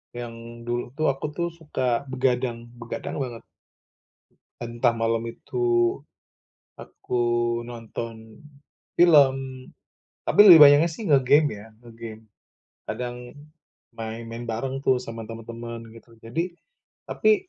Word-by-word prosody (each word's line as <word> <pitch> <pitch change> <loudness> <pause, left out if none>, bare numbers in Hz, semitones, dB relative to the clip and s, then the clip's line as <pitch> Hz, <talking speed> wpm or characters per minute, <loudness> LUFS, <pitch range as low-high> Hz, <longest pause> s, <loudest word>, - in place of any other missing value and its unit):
yang 115 0 -8
dulu 120 +1 -4
tuh 155 +1 0
aku 135 +2 -6
tuh 170 +2 -2
suka 140 -6 -2
begadang 125 -2 -1
begadang 115 0 -6
banget. 120 -4 -5 1.2
Entah 120 0 0
malam 115 0 0
itu 120 0 0 0.8
aku 125 - -4 0.5
nonton 115 -1 -8 0.6
film, 150 -6 +6 0.9
tapi - - -1
lebih 170 -4 +11
banyaknya 145 +4 +6
sih 210 +7 -7
nge-game 145 0 +4
ya, 105 - -12 0.2
nge-game. 115 -1 -10 0.6
Kadang 120 0 -4 0.8
main 115 0 -6
main 115 +1 -6
bareng 130 +4 -3
tuh 130 -1 +3
sama 115 -2 -7
temen-temen 115 0 -8
gitu. 115 0 -17
Jadi 165 +10 -3 0.5
tapi 405 -3 +2
120 Hz, 110 wpm, -25 LUFS, 115-135 Hz, 1.2 s, lebih